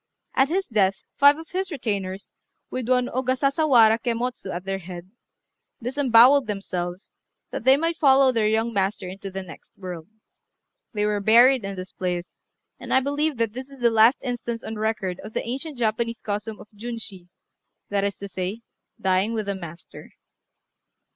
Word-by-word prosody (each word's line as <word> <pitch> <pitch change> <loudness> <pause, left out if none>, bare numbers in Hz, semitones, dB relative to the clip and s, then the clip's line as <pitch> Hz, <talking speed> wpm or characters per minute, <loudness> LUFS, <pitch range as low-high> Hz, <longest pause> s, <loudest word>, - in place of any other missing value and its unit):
At 265 +1 +3
his 380 +3 0
death, 195 -5 +1 0.2
five 285 +1 +7
of 325 0 -10
his 375 0 -3
retainers, 200 - -4 0.4
with 255 -2 -4
one 250 -1 +3
Ogasasawara 255 -2 +3
Kemmotsu 235 -3 -3
at 175 0 -5
their 195 0 -3
head, 180 0 -9 0.7
disembowelled 255 +1 +5
themselves, 185 -3 -4 0.4
that - - -5
they 265 +1 +7
might 330 +2 -1
follow 270 -2 +5
their 225 -3 +1
young 225 +2 +1
master 195 -1 -1
into 195 +2 -7
the 190 0 -5
next 170 -3 -14
world. 180 -4 -7 0.8
They 210 -2 -1
were 210 -1 0
buried 235 +4 +5
in 195 0 -4
this 185 0 -7
place; 180 -1 -4 0.4
and - - -8
I 260 - +5
believe 285 +2 -1
that 225 -2 0
this 260 +2 -7
is 275 -2 -14
the 235 -1 +4
last 225 +4 +5
instance 240 -2 -4
on 220 - -5
record 210 -4 -2
of 215 +2 -9
the - - -2
ancient 275 +4 -4
Japanese 230 0 -1
custom 210 +1 -4
of - - -12
Junshi, 215 -5 -7 0.6
that 200 -1 0
is 200 0 -1
to 200 - -8
say, 190 +4 -4 0.4
"dying 190 +4 +1
with 215 -2 -2
the 200 - -1
master." 170 -3 -10
225 Hz, 165 wpm, -24 LUFS, 195-255 Hz, 0.8 s, five